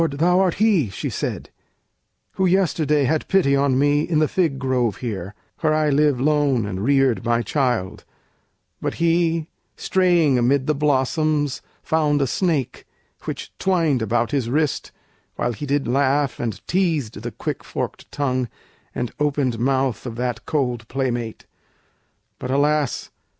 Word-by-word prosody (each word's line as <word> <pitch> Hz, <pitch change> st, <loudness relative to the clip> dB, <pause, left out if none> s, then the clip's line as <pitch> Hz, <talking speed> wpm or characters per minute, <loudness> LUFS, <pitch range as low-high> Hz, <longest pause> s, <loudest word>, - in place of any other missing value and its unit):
thou 170 Hz, +6 st, +2 dB
art 185 Hz, -3 st, +2 dB
he," 195 Hz, -, +3 dB
she 95 Hz, -, -4 dB
said, -, -, -4 dB, 0.8 s
"who 190 Hz, -1 st, +1 dB
yesterday 165 Hz, -5 st, +2 dB
Had 155 Hz, +4 st, 0 dB
pity 170 Hz, -8 st, +3 dB
on 140 Hz, -2 st, +2 dB
me 145 Hz, +1 st, +3 dB
in 160 Hz, 0 st, 0 dB
the 155 Hz, 0 st, +3 dB
fig 165 Hz, -6 st, 0 dB
grove 130 Hz, -5 st, 0 dB
here, 105 Hz, -5 st, -5 dB, 0.2 s
Where 155 Hz, -1 st, +2 dB
I 155 Hz, -1 st, +2 dB
live 145 Hz, -2 st, +3 dB
lone 140 Hz, -4 st, +2 dB
and 95 Hz, -1 st, -4 dB
reared 135 Hz, -2 st, +2 dB
my 120 Hz, 0 st, +1 dB
child; 120 Hz, -6 st, -1 dB, 0.8 s
but -, -, -2 dB
he, 165 Hz, -1 st, +1 dB, 0.3 s
Straying 175 Hz, -8 st, +2 dB
amid 130 Hz, +3 st, +2 dB
the 155 Hz, -, +2 dB
blossoms, 145 Hz, 0 st, +1 dB, 0.2 s
found 150 Hz, -2 st, +1 dB
a 140 Hz, -, +2 dB
snake, 150 Hz, -1 st, -1 dB, 0.4 s
Which -, -, -6 dB
twined 165 Hz, -9 st, +2 dB
about 115 Hz, +3 st, 0 dB
his 135 Hz, -5 st, 0 dB
wrist, 150 Hz, +2 st, 0 dB, 0.4 s
while 120 Hz, -, -1 dB
he 145 Hz, +6 st, -6 dB
did 140 Hz, +1 st, 0 dB
laugh 140 Hz, +2 st, +1 dB
And 115 Hz, -3 st, -4 dB
teased 160 Hz, -, 0 dB
the 120 Hz, -, -4 dB
quick -, -, -5 dB
forked -, -, -5 dB
tongue 130 Hz, -3 st, -1 dB, 0.5 s
and 120 Hz, -2 st, -2 dB
opened 140 Hz, -5 st, 0 dB
mouth 130 Hz, -1 st, 0 dB
Of 115 Hz, -, -6 dB
that 120 Hz, -2 st, -3 dB
cold 125 Hz, -7 st, -1 dB
playmate. 120 Hz, -3 st, -3 dB, 0.9 s
But 125 Hz, -, -5 dB
alas! 145 Hz, 0 st, +1 dB
140 Hz, 145 wpm, -22 LUFS, 125-155 Hz, 0.9 s, he